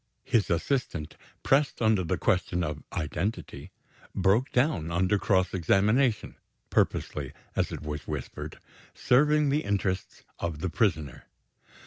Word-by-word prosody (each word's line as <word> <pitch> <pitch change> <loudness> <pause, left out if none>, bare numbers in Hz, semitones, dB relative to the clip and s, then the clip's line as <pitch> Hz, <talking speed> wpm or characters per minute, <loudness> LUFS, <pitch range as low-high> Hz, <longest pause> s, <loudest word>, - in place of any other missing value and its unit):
His 110 -3 +1
assistant, 85 - -1 0.3
pressed 140 +1 +2
on 110 -1 +4
the 90 -5 0
question 90 -1 +1
of 75 -2 -4
identity, 90 +6 -3 0.5
broke 100 +8 +2
down 125 - +1
under 95 +4 +1
cross 95 -3 +2
examination 105 - +2 0.3
purposely, - - 0 0.2
as - - 0
it - - -6
was 75 -1 -5
whispered, 75 -4 -5 0.4
serving 150 +3 +3
the 145 +3 +1
interests 95 -2 -2 0.2
of 85 -3 -3
the 95 - -2
prisoner. 80 - 0
95 Hz, 120 wpm, -28 LUFS, 85-120 Hz, 0.5 s, on